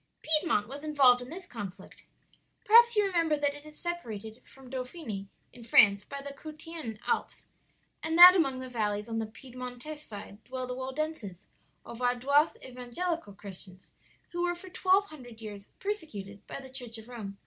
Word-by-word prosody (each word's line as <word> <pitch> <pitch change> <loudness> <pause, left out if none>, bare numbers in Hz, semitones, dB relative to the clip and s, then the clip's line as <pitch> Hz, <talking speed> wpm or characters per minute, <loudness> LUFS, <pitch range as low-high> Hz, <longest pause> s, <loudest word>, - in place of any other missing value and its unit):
"Piedmont 305 - +2
was 280 +4 -8
involved 270 -5 +5
in 245 - -8
this 355 +4 -7
conflict. 200 - -9 0.6
Perhaps 470 +2 +7
you 420 -1 +4
remember 335 -5 +2
that 290 -1 +1
it 290 +1 -11
is 300 - -12
separated 225 - -5
from 270 -1 -16
Dauphiny, 255 - -5 0.3
in 240 - -12
France, 205 -3 +6
by 280 0 -7
the 280 0 -6
Cottian 310 -5 -7
Alps, - - -2 0.6
and 320 +1 0
that 355 +1 +13
among 275 -8 +2
the 260 0 -6
valleys 210 -3 -1
on 225 -1 -2
the 220 - -2
Piedmontese 250 +5 -8
side 205 -4 -10
dwell 255 +1 -4
the 250 - -4
Waldenses 260 - -4 0.4
or - - -8
Vaudois 250 +5 +2
evangelical 255 - -4
Christians, 190 -2 -11 0.4
who 345 - -3
were 350 0 +1
for 370 +2 -11
twelve 380 +2 +3
hundred 245 -7 -12
years 205 -3 -8
persecuted 210 - -5
by - - -6
the 265 -1 -11
Church 245 -3 -3
of 220 0 -11
Rome. 210 -5 -7
255 Hz, 170 wpm, -30 LUFS, 220-315 Hz, 0.6 s, that